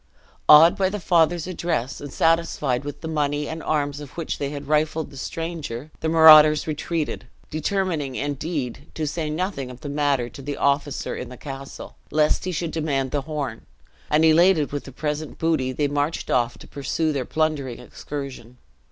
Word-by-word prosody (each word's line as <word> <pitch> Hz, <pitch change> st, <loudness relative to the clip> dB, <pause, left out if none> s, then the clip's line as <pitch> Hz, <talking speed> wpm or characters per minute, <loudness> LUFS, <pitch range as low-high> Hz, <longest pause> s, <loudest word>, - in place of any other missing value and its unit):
Awed 160 Hz, +3 st, +9 dB
by 190 Hz, -1 st, +2 dB
the 210 Hz, +2 st, -4 dB
father's 170 Hz, -1 st, +2 dB
address, 165 Hz, -7 st, -2 dB
and 145 Hz, -1 st, -7 dB
satisfied 165 Hz, -6 st, +1 dB
with 145 Hz, 0 st, -7 dB
the 160 Hz, -, -5 dB
money 150 Hz, -2 st, -1 dB
and 160 Hz, +1 st, -5 dB
arms 145 Hz, -2 st, -1 dB
of 145 Hz, 0 st, -11 dB
which 165 Hz, -, -3 dB
they 140 Hz, -, -2 dB
had 145 Hz, -1 st, -7 dB
rifled 155 Hz, +1 st, 0 dB
the -, -, -13 dB
stranger, 155 Hz, -2 st, -5 dB
the 160 Hz, -, -1 dB
marauders 155 Hz, -2 st, +8 dB
retreated; 155 Hz, +1 st, -3 dB, 0.2 s
determining, 155 Hz, -4 st, -1 dB
indeed, 145 Hz, -1 st, -3 dB
to 155 Hz, -, -2 dB
say 155 Hz, +1 st, -2 dB
nothing 155 Hz, -4 st, -3 dB
of 125 Hz, 0 st, -11 dB
the 145 Hz, -, -6 dB
matter 140 Hz, -4 st, +1 dB
to 135 Hz, -, -11 dB
the 145 Hz, +1 st, -5 dB
officer 140 Hz, 0 st, 0 dB
in -, -, -6 dB
the 125 Hz, -, -10 dB
castle, 135 Hz, 0 st, -9 dB
lest 150 Hz, +2 st, +2 dB
he 185 Hz, -, -1 dB
should 170 Hz, -1 st, -3 dB
demand 140 Hz, -5 st, -1 dB
the 145 Hz, -, 0 dB
horn; 140 Hz, -6 st, -5 dB, 0.4 s
and, 155 Hz, +2 st, +4 dB
elated 160 Hz, -1 st, +4 dB
with 145 Hz, 0 st, -4 dB
the 135 Hz, -, -9 dB
present 150 Hz, +3 st, -4 dB
booty, 155 Hz, -6 st, +1 dB
they 145 Hz, +3 st, 0 dB
marched 145 Hz, +3 st, -2 dB
off 120 Hz, -2 st, +1 dB
to -, -, -13 dB
pursue 155 Hz, +3 st, -1 dB
their 135 Hz, -2 st, -1 dB
plundering 150 Hz, -4 st, -1 dB
excursion. 135 Hz, -4 st, -8 dB
150 Hz, 180 wpm, -23 LUFS, 140-160 Hz, 0.4 s, Awed